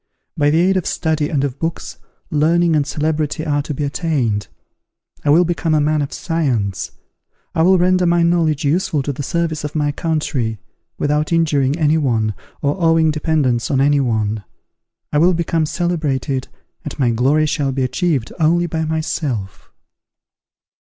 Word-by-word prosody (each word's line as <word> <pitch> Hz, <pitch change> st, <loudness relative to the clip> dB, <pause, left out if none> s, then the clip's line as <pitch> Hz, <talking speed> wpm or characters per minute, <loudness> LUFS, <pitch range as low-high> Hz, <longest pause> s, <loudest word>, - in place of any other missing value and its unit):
By 145 Hz, 0 st, +2 dB
the 160 Hz, +2 st, +3 dB
aid 190 Hz, +2 st, +3 dB
of 185 Hz, -, -2 dB
study 155 Hz, -2 st, 0 dB
and 140 Hz, -3 st, 0 dB
of 140 Hz, -1 st, -3 dB
books, 165 Hz, 0 st, -4 dB, 0.3 s
learning 165 Hz, +2 st, +3 dB
and 145 Hz, -2 st, +1 dB
celebrity 155 Hz, +1 st, -1 dB
are 145 Hz, -2 st, +1 dB
to 150 Hz, -, -6 dB
be 145 Hz, +1 st, -3 dB
attained. 140 Hz, -9 st, -1 dB, 0.8 s
I 145 Hz, -, 0 dB
will 170 Hz, +5 st, +5 dB
become 165 Hz, -2 st, 0 dB
a -, -, +3 dB
man 150 Hz, +1 st, +1 dB
of 140 Hz, -, -3 dB
science: 130 Hz, -, -1 dB, 0.6 s
I -, -, +1 dB
will 185 Hz, +3 st, +5 dB
render 180 Hz, 0 st, +3 dB
my 170 Hz, 0 st, +3 dB
knowledge 165 Hz, -4 st, +1 dB
useful 155 Hz, -1 st, +1 dB
to 145 Hz, -, -2 dB
the 140 Hz, -, -6 dB
service 165 Hz, 0 st, -2 dB
of 150 Hz, +1 st, -5 dB
my 145 Hz, -1 st, +1 dB
country, 145 Hz, -8 st, -2 dB, 0.4 s
without 150 Hz, +2 st, 0 dB
injuring 150 Hz, -4 st, +2 dB
any 155 Hz, -1 st, +2 dB
one, 115 Hz, -7 st, 0 dB, 0.3 s
or 145 Hz, +6 st, 0 dB
owning 165 Hz, -1 st, +4 dB
dependence 150 Hz, -6 st, 0 dB
on 135 Hz, -, +1 dB
any 145 Hz, +1 st, +3 dB
one. 110 Hz, -4 st, -1 dB, 0.7 s
I 150 Hz, -, +3 dB
will 175 Hz, +3 st, +4 dB
become 165 Hz, -1 st, 0 dB
celebrated, 150 Hz, -7 st, -1 dB, 0.4 s
and -, -, -7 dB
my 125 Hz, -4 st, +2 dB
glory 135 Hz, +7 st, +2 dB
shall 145 Hz, -3 st, 0 dB
be 135 Hz, 0 st, -1 dB
achieved 140 Hz, -2 st, -1 dB
only 170 Hz, +2 st, +3 dB
by 160 Hz, -1 st, -2 dB
myself. 155 Hz, -, -3 dB
150 Hz, 165 wpm, -18 LUFS, 140-165 Hz, 0.8 s, will